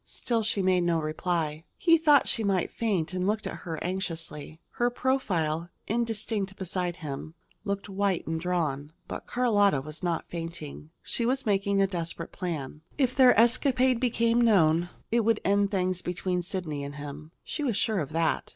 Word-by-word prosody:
Still 235 -2 -1
she 210 -2 0
made 185 -1 +3
no 170 -1 +2
reply. 155 0 -2
He 330 -1 +4
thought 295 -3 +5
she 225 - +1
might 195 -3 +1
faint, 190 -7 -1
and 185 0 -1
looked 215 +1 0
at - - -4
her 165 -2 -5
anxiously. 165 -4 -4
Her 240 0 +1
profile, 175 - 0 0.2
indistinct 215 -3 -2
beside 180 -2 -2
him, 155 0 -7 0.3
looked 200 0 -2
white 195 -2 0
and 160 0 -2
drawn. 155 -5 -1
But - - -7
Carlotta 205 - +3
was 155 +3 -8
not 175 -3 -1
fainting. 165 -3 -7
She 235 - -1
was 265 +3 0
making 200 -1 +1
a 195 - +5
desperate 170 -3 -4
plan. 155 -5 -5 0.2
If 260 -3 +1
their 255 -5 +6
escapade 250 +1 +4
became 235 -1 +2
known, 175 -7 +4 0.2
it 235 - +3
would 225 -1 +2
end 200 +1 +3
things 185 -2 0
between 180 0 -2
Sidney 175 -5 -4
and 140 0 -6
him. 145 +2 -8
She - - -4
was 240 -7 0
sure 220 -4 +1
of 145 - -3
that. 165 0 0
185 Hz, 170 wpm, -28 LUFS, 165-225 Hz, 0.3 s, their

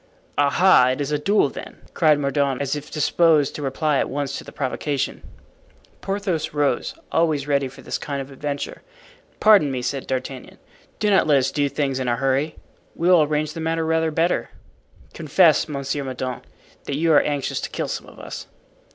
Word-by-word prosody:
"Aha! 145 0 +5
It 130 - -6
is 145 0 -2
a 150 - 0
duel, 195 -2 +2
then?" - - -9 0.2
cried 155 -3 +4
Mordaunt, 140 -2 0
as 140 0 -1
if 150 0 -7
disposed 155 -1 +3
to - - -6
reply 145 +1 0
at - - -1
once 140 0 -3
to - - -10
the - - -11
provocation. 140 +1 -2 0.8
Porthos 185 -6 -2
rose, 145 -4 0 0.2
always 155 -4 +1
ready 140 -2 +1
for 130 - -13
this - - -3
kind 140 -2 -4
of 135 0 -7
adventure. 140 +1 -5 0.6
"Pardon 210 -9 +6
me," 130 -2 -3
said 135 +1 -3
D'Artagnan. 130 0 -5 0.4
"Do 210 -1 +1
not 195 - +4
let 145 -2 +5
us 135 0 +1
do 145 -1 0
things 135 -2 -1
in 130 - -2
a 120 - +2
hurry. 135 +4 0 0.4
We 170 +2 +1
will 180 -3 +7
arrange 150 0 0
the 165 - -7
matter 165 0 -1
rather 160 0 +1
better. 165 +3 0 0.6
Confess, - - +3
Monsieur 140 0 -3
Mordaunt, 130 -1 -5 0.4
that 140 - -3
you 165 +1 +3
are - - +7
anxious 145 -2 -2
to - - -4
kill - - -3
some - - -5
of - - -15
us." - - -8
145 Hz, 185 wpm, -22 LUFS, 135-160 Hz, 0.8 s, will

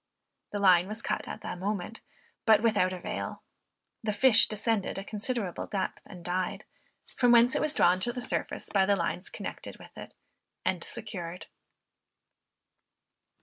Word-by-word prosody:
The 205 - -2
line 185 -3 +5
was 215 +3 -4
cut - - -2
at - - -6
the - - -5
moment, 200 +3 -4 0.5
but 220 0 +6
without 200 -5 +3
avail. 185 -1 -5 0.6
The 215 -1 0
fish 225 +1 +6
descended 215 -2 -1
a 195 - -4
considerable 215 -2 -3
depth, 195 -2 -3
and 180 -3 -11
died; 180 +1 -2 0.5
from 245 -2 +4
whence 240 +1 +6
it - - +1
was 305 0 0
drawn 180 +1 +4
to 240 +6 -1
the 250 - -5
surface 245 - -2
by 195 -2 +3
the 200 - +4
lines 175 0 -2
connected - - -7
with - - -15
it, - - -10 0.5
and - - 0
secured. 175 -2 -6
205 Hz, 150 wpm, -29 LUFS, 185-225 Hz, 0.6 s, but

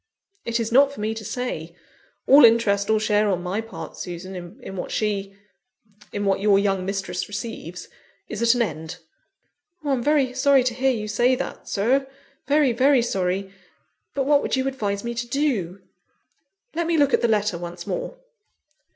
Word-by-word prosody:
"It 235 0 -1
is 230 0 -2
not 275 +3 +5
for 280 - -11
me 215 +1 -1
to 225 -1 -7
say. 210 -8 -4 0.5
All 280 +2 +8
interest 220 -3 +4
or 220 0 +3
share 210 -1 +2
on 180 -2 -1
my 185 +4 -2
part, 225 0 -9
Susan, 180 +3 -7
in 195 - -7
what 180 - -5
she 200 -2 -2 0.8
in 205 0 -3
what 195 -1 +2
your 200 0 +4
young 195 -2 +1
mistress 195 0 -3
receives, 205 -4 -6 0.4
is 215 - -5
at 235 +1 +4
an 240 - +3
end." 160 -2 -5 0.9
"I'm 275 -4 0
very 280 -2 +2
sorry 270 0 +4
to 250 -1 0
hear 265 +2 +1
you 220 -5 -2
say 240 +5 +2
that, 265 - -6
Sir; 260 +7 +1 0.4
very, 290 -2 +4
very 260 +1 +4
sorry. 190 -2 -2 0.6
But 270 -1 0
what 285 0 +4
would - - -1
you 260 0 0
advise 205 -7 -2
me 235 0 -3
to 235 +1 -4
do?" 225 - -1 0.9
"Let 335 0 -1
me 335 -1 +2
look 285 -2 +3
at - - +4
the 235 - +3
letter 210 -5 +1
once 175 0 -7
more." - - -4
220 Hz, 175 wpm, -23 LUFS, 195-260 Hz, 0.9 s, All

